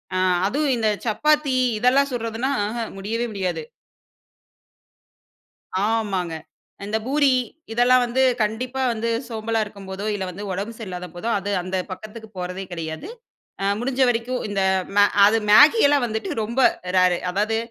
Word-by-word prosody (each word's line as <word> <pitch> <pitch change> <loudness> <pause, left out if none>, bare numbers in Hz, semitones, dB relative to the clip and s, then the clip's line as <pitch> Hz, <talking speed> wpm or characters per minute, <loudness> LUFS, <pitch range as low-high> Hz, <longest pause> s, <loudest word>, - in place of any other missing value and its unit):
அ - - +1 0.3
அதுவும் 285 +5 0
இந்த 220 -1 +1 0.2
சப்பாத்தி 300 +5 +2 0.3
இதெல்லாம் 260 +4 +4
சுடுறதுன்னா 230 +2 -2 0.2
ஆஹாம்! 230 +1 -4
முடியவே 225 +4 -2
முடியாது. 180 -5 -2 2.2
ஆமாங்க. 195 -7 -1 0.5
இந்த 215 +2 -1
பூரி, 285 0 +3 0.4
இதெல்லாம் 245 +2 +4
வந்து 255 +2 +1 0.2
கண்டிப்பா 250 +5 -2
வந்து 230 0 -3 0.2
சோம்பலா 225 0 -2
இருக்கும் 200 -2 -12
போதோ, 195 +2 -5
இல்ல 195 - -3
வந்து 190 +3 -8
உடம்பு 200 +5 -4
சரியில்லாத 180 -4 -6
போதோ, 200 +7 -5
அது 200 +1 -4
அந்த 185 +1 -3 0.2
பக்கத்துக்கு 215 +3 -9
போறதே 180 +2 -4
கெடையாது. 165 - -5 0.5
அ 195 - 0
முடிஞ்ச 260 +2 -1
வரைக்கும் 245 +2 -2
இந்த 200 -1 -1 0.3
மே 205 - +7
அ - - -4 0.2
அது 220 +2 +4
மேகியெல்லாம் 290 - +6
வந்துட்டு 220 - -4
ரொம்ப 235 +5 -3 0.4
ரேரு. 185 -1 +4
அதாவது, 215 +4 0
220 Hz, 140 wpm, -22 LUFS, 195-250 Hz, 2.2 s, மே